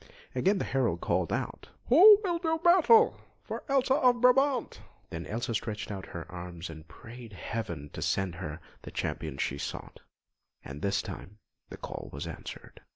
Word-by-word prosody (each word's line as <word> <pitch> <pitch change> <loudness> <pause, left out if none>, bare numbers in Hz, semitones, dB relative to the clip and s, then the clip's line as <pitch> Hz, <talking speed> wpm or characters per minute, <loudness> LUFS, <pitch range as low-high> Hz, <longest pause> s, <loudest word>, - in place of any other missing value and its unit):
Again 195 +2 +2
the - - -2
herald 125 -11 0
called - - 0
out: - - -4 0.2
"Who 400 - +9
will 345 -3 0
do 320 -2 0
battle 370 +7 +5 0.2
for - - -6
Elsa 270 -1 +3
of 250 -4 +4
Brabant?" 250 +1 +3 0.3
Then 80 +1 -6
Elsa 115 +2 -3
stretched 110 -1 -3
out 95 -2 -6
her 85 -1 -7
arms 85 -1 -7
and 80 0 -12
prayed 115 +6 -12
Heaven 85 -8 -5
to - - -6
send 95 -3 0
her 80 -2 -6 0.2
the - - -9
Champion 75 -4 -4
she 70 0 -2
sought; - - -6 0.7
and 70 +2 -8
this 100 +2 0
time 105 +3 -9 0.3
the - - -9
call - - -7
was 70 +3 -6
answered. 80 - -9
110 Hz, 165 wpm, -29 LUFS, -, 0.7 s, Who